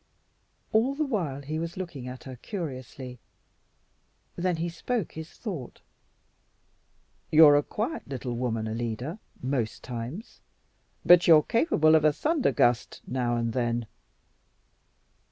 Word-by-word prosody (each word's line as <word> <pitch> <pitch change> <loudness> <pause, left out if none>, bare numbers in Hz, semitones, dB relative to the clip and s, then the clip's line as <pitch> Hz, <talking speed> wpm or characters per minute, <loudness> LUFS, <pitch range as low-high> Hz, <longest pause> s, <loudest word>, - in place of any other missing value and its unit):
All 240 +6 +3
the 305 +1 0
while 165 - -2
he 155 +3 -3
was 170 +1 -5
looking 170 -9 -6
at 125 0 -8
her 130 -1 -8
curiously; 130 - -7 1.2
then 180 0 0
he 165 +1 -2
spoke 185 +4 -3
his 160 0 -8
thought. 170 - -7 1.5
"You're 155 -2 +8
a 145 - +5
quiet 230 - -4
little 130 -3 -4
woman, 115 -2 -2
Alida, 120 - -4 0.2
most 130 -4 -2
times, 125 - -7 0.6
but 175 0 +7
you're 155 -3 +8
capable 165 - +3
of 160 -1 +5
a 155 -1 +5
thunder 300 - +1
gust 120 -1 +1
now 125 -2 -1
and 115 -1 -1
then." 120 -1 0
145 Hz, 125 wpm, -27 LUFS, 125-175 Hz, 1.5 s, You're